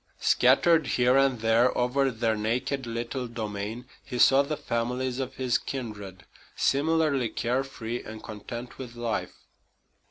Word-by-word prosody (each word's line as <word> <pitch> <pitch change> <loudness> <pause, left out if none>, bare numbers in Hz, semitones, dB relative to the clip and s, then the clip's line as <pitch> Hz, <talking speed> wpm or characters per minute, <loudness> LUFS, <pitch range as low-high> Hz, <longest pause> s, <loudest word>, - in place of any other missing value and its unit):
Scattered 140 +4 +4
here 125 +1 +3
and 135 -4 +3
there 115 +2 +3
over 135 +3 +2
their 115 -2 0
naked 125 +5 -2
little 120 +2 -3
domain 110 0 -5 0.2
he 125 - -6
saw 135 +3 +6
the 145 +2 -3
families 125 -1 -2
of 130 0 -4
his 130 -2 +1
kindred, 105 -8 -7 0.3
similarly 145 -3 +2
care 125 +5 -1
free 120 -3 -5
and 110 0 -9
content 120 +3 -8
with 125 -3 -8
life. 120 -2 -4
125 Hz, 135 wpm, -27 LUFS, 115-135 Hz, 0.3 s, saw